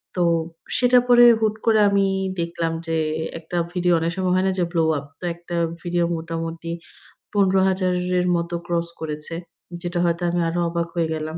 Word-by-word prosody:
তো 180 - 0 0.6
সেটা 250 0 +5
পরে 240 -1 +7 0.2
হুট 215 -1 +2
করে 220 -2 +4
আমি 200 -1 +3 0.3
দেখলাম 170 -1 -2
যে 165 0 0 0.4
একটা 165 +2 -5 0.2
ভিডিও 180 -1 +2
অনেক 165 +1 -1
সময় 185 -1 +1
হয় 185 +1 +2
না - - +2
যে - - +3
blow 165 -2 +2
up 140 - -6
তো - - -15
একটা 170 0 -7 0.3
ভিডিও 175 -1 +1
মোটামুটি 165 0 -5 0.6
৳১৫,০০০ 190 -2 +2 0.3
এর 180 - 0
মতো 170 0 -4
ক্রস 170 -1 0
করেছে, 155 +1 -5 0.5
যেটা 175 0 -2
হয়তো 170 0 0
আমি 175 - 0
আরও 175 +1 -2
অবাক 170 0 -2
হয়ে 170 -2 +1
গেলাম। 155 +1 -4
175 Hz, 175 wpm, -22 LUFS, 165-185 Hz, 0.6 s, পরে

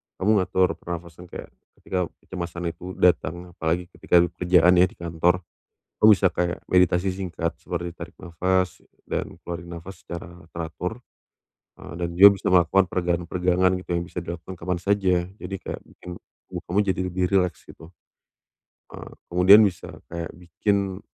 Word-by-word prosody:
kamu 100 - -1
ngatur 95 0 +2
pernafasan 85 0 -8
kayak, - - -9 0.2
ketika 90 -2 -2 0.2
kecemasan 85 -1 -5
itu 90 +2 -9
datang 90 0 +1
apalagi 85 +2 -2
ketika 85 0 +3 0.2
kerjaan 90 -1 +5
ya 90 - +7
di - - -17
kantor, 85 +1 0 0.6
kamu 110 - +9
bisa 100 -1 +5
kayak 90 0 -1
meditasi 90 +1 +3
singkat 85 -3 -3
seperti 85 0 -5
tarik 85 0 -9
nafas 90 +1 -1 0.2
dan - - -4
keluarin 85 0 -6
nafas 95 +3 -12
secara 85 0 -9
teratur, 85 +7 -5 0.8
eee, - - -11
dan 85 - -1
juga 100 +3 +11
bisa - - -1
melakukan 90 +1 +4
peregangan 85 -1 -1
peregangan 90 0 +2
gitu 90 - -9
yang 85 0 0
bisa 90 -2 -6
dilakukan 85 +2 -7
kapan 85 +1 -3
saja 90 -3 +1
jadi 95 - -7
kayak - - -6
bikin 90 - -13 0.4
tubuh - - -6
kamu 90 - -1
jadi 95 - 0
lebih 90 0 0
rileks 90 -5 +1
gitu, 85 +2 -14 1.0
eee, - - -9 0.2
kemudian 95 +5 +8
bisa 95 -4 -2 0.2
kayak 85 -1 -4
bikin, 95 +2 -1
90 Hz, 155 wpm, -24 LUFS, 85-95 Hz, 1.0 s, juga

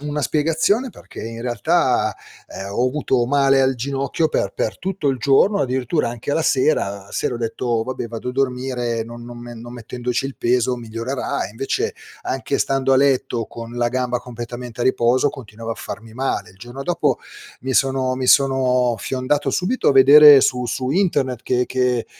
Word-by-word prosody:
una 150 0 -3
spiegazione 165 - +1
perché - - -12
in 115 +1 -7
realtà, 120 -3 +1 0.3
ehm, 95 - -7
ho 120 +5 +1
avuto 130 -3 0
male 135 0 +3
al 130 0 +2
ginocchio 140 +5 -1
per 100 - -1
per 105 -3 -2
tutto 185 -6 -2
il 135 -2 0
giorno, 165 +10 +3
addirittura 130 +3 0
anche 120 +3 -5
alla 160 +2 +1
sera. 140 -8 +2 0.2
La - - -19
sera 125 - -2
ho - - -3
detto: 115 0 -1
"Vabbè 130 0 -4
vado 115 +2 -6
a - - -3
dormire, 125 -3 -1
non 120 +1 -10
non 120 0 -9
me 120 0 -9
non 120 +1 -10
mettendoci 125 +2 -3
il 135 - -8
peso 125 +1 +1
migliorerà"; 120 +4 -3
e - - -11
invece, 130 +6 -2 0.3
anche 135 +1 -2
stando 135 0 +1
a - - +5
letto 130 -4 +1
con 115 0 -9
la 120 0 +1
gamba 125 0 -1
completamente 120 0 -7
a - - 0
riposo 130 +2 +2
continuavo 115 -2 -7
a - - -7
farmi 110 0 -8
male. 135 +2 -2
Il 95 - -21
giorno 120 +4 -8
dopo, 175 -1 0 0.4
mi 130 - -2
sono 130 -1 +1
mi 130 0 -3
sono 130 -3 +3
fiondato 135 +5 -1
subito 200 - 0
a - - +5
vedere 140 +1 +9
su 125 -1 +1
su 125 +2 -2
internet 145 - 0
che 125 -1 0
che 125 -2 0
125 Hz, 185 wpm, -20 LUFS, 120-135 Hz, 0.4 s, vedere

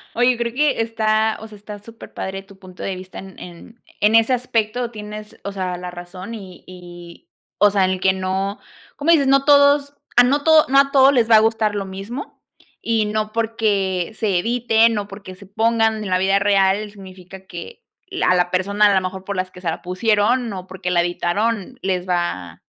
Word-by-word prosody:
Oye, 245 +1 +4
yo 245 - -3
creo 235 0 -3
que 290 -2 +1
está, 220 -1 0
o 220 - -8
sea, 215 -1 -13
está 205 0 -10
superpadre 200 -3 -8
tu 195 0 -18
punto 185 -1 -11
de 195 - -3
vista, 185 0 -10
en 190 -1 -12
en 180 +7 -13 0.2
en 210 +2 +4
ese 225 +3 +4
aspecto 240 -1 -1
tienes, 210 -1 -9
o 200 - -4
sea, 185 -2 -4
la 180 0 -7
razón 180 +4 -9
y 190 -5 -10
y, 175 -1 -13 0.3
o 205 - +5
sea, 195 -2 +2
en 185 0 -1
que 190 +1 +3
no, 190 +2 -3 0.4
como 300 +4 +1
dices, 290 -5 +4
no 275 0 +3
todos, 285 0 +4 0.2
ah, 245 - +9
no 280 +4 +1
todo 315 0 +6
no 275 +1 +4
a 275 0 +3
todos 275 0 +6
les 235 -4 +2
va 225 - +7
a - - +7
gustar 220 -1 +1
lo 200 -1 -3
mismo 195 +8 -8 0.4
y 225 -2 0
no 215 0 -2
porque 210 -5 -1
se 200 -6 0
eviten 230 +1 +2
o 205 -1 -3
porque 195 -2 -10
se 200 +2 -14
pongan 220 +1 +1
en 200 - -5
la 185 - +2
vida 195 +1 +2
real 200 +1 +2
significa 190 -1 -13
que 190 - -10 0.3
la 370 - 0
a - - +4
la 175 0 +1
persona 200 +3 +2
a - - +2
lo 190 - +3
mejor 185 +1 -5
por 200 +1 -5
las 185 0 -3
que 180 - -13
se 175 - -2
la 160 - -4
pusieron, 220 +5 +1
o 185 -2 -7
porque 185 -1 -5
la 175 -1 +3
editaron, 200 +7 -2
les 185 -1 -2
va 95 - -3
205 Hz, 210 wpm, -20 LUFS, 185-230 Hz, 0.4 s, ah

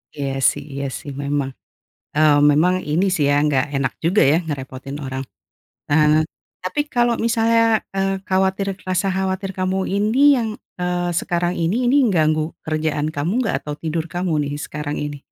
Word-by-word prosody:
Iya 140 -2 -3 0.2
sih 145 - -7
iya 140 0 -3
sih 145 - -8
memang, 140 -1 -1 0.7
eee, 155 -1 +5 0.2
memang 170 +5 +3 0.2
ini 170 +6 +2
sih 155 - +1
ya, 145 - +3
nggak 140 -3 +2
enak 135 -1 0
juga 185 +5 +3
ya 160 - +4
ngerepotin 135 -1 -6
orang. 130 0 -4 0.7
Eee, 155 +1 +4 0.4
tapi 240 +11 -1
kalau 240 -1 +3
misalnya, 230 0 +3 0.3
eee, 195 0 0
khawatir, 190 +1 +1 0.2
rasa 185 +1 +1
khawatir 190 0 -2
kamu 185 0 0
ini 210 +6 0 0.2
yang, 230 -2 -1 0.3
eee, 180 0 0
sekarang 175 0 -1
ini, 165 +5 +1
ini 245 +3 +3
ganggu 155 -4 +2 0.2
kerjaan 155 -1 -1
kamu 155 +6 -1
nggak? - - 0
Atau 150 - -5
tidur 160 0 -2
kamu 175 -1 -2 0.2
nih 145 - -4
sekarang 150 -1 -4
ini? 145 -1 -4
165 Hz, 160 wpm, -21 LUFS, 145-190 Hz, 0.7 s, eee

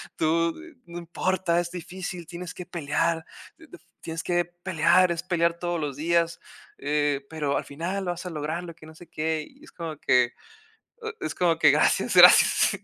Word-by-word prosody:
tú 165 +1 +1 0.3
no 170 0 -8
importa, 175 0 -1
es 175 0 -3
difícil, 180 -1 -7
tienes 175 -1 -7
que 180 - -8
pelear 165 0 -1 0.8
tienes 165 0 -5
que 175 -1 +1
pelear, 175 0 +2
es 170 0 -3
pelear 170 -2 0
todos 175 -1 -2
los 145 -2 -4
días, 170 +1 0 0.4
eh, 145 -1 -1
pero 150 -3 -1
al - - -4
final 180 +7 -4
vas 175 0 -4
a 180 - -4
lograrlo, 165 +2 -4
que 155 - -15
no 160 0 -14
sé 170 0 -14
qué. 155 -1 -2
Y 275 +2 -22
es - - -15
como 165 -3 -6
que 125 -1 +3 0.9
es - - -3
como 170 -2 +1
que 150 - +7
gracias, 150 - +2
gracias. - - +7
170 Hz, 170 wpm, -25 LUFS, 155-175 Hz, 0.9 s, que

